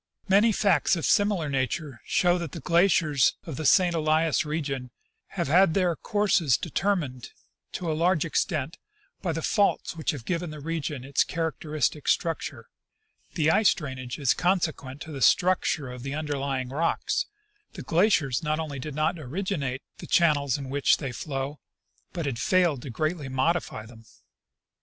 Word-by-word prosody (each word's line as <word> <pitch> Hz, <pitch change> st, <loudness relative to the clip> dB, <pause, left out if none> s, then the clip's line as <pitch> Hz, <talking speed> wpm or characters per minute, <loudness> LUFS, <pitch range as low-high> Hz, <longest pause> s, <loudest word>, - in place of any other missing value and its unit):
Many 205 Hz, +4 st, +5 dB
facts 200 Hz, -3 st, +2 dB
of 165 Hz, -, -3 dB
similar 205 Hz, -6 st, +2 dB
nature 135 Hz, -1 st, -2 dB
show 180 Hz, 0 st, +2 dB
that 170 Hz, -5 st, -6 dB
the -, -, -5 dB
glaciers 170 Hz, -5 st, +3 dB
of 160 Hz, -, -6 dB
the 155 Hz, 0 st, -1 dB
St. 180 Hz, -3 st, +5 dB
Elias 160 Hz, 0 st, +2 dB
region 140 Hz, -5 st, -3 dB, 0.5 s
have 170 Hz, -4 st, 0 dB
had 170 Hz, +3 st, +4 dB
their 180 Hz, -3 st, +2 dB
courses 185 Hz, -, +2 dB
determined, 165 Hz, -, -2 dB, 0.4 s
to 170 Hz, -3 st, -2 dB
a -, -, 0 dB
large 170 Hz, +1 st, +2 dB
extent, 155 Hz, -1 st, -1 dB, 0.4 s
by 175 Hz, -, -1 dB
the 165 Hz, 0 st, -4 dB
faults 205 Hz, -4 st, +1 dB
which 160 Hz, -, -3 dB
have 135 Hz, -6 st, -3 dB
given 175 Hz, -1 st, -2 dB
the 155 Hz, -1 st, -8 dB
region 150 Hz, -3 st, -4 dB
its 140 Hz, +1 st, +2 dB
characteristic 155 Hz, -3 st, -2 dB
struc 165 Hz, -1 st, +1 dB
ture: -, -, -12 dB, 0.7 s
the 155 Hz, -2 st, +3 dB
ice 215 Hz, +3 st, +4 dB
drainage 130 Hz, -6 st, -6 dB
is 140 Hz, -4 st, +2 dB
consequent 160 Hz, -7 st, -1 dB
to 160 Hz, -, -7 dB
the 140 Hz, -3 st, -6 dB
structure 160 Hz, -3 st, +2 dB
of 125 Hz, -1 st, -8 dB
the 135 Hz, +2 st, -4 dB
underlying 140 Hz, -4 st, -2 dB
rocks; 155 Hz, +5 st, -1 dB, 0.5 s
the -, -, -8 dB
glaciers 165 Hz, -, +2 dB
not 155 Hz, 0 st, -1 dB
only 150 Hz, -4 st, -4 dB
did 145 Hz, +2 st, -6 dB
not 155 Hz, +3 st, 0 dB
originate 145 Hz, -3 st, -3 dB, 0.2 s
the -, -, -8 dB
channels 145 Hz, -6 st, +3 dB
in 135 Hz, -2 st, -7 dB
which 140 Hz, 0 st, +3 dB
they 135 Hz, -4 st, -4 dB
flow, 135 Hz, +3 st, -4 dB, 0.5 s
but 170 Hz, -3 st, -4 dB
have 130 Hz, -5 st, -3 dB
failed 170 Hz, -3 st, +2 dB
to 140 Hz, -, -8 dB
greatly 155 Hz, +3 st, -2 dB
modify 130 Hz, -3 st, -1 dB
them. 115 Hz, 0 st, -14 dB
155 Hz, 160 wpm, -26 LUFS, 135-170 Hz, 0.7 s, Many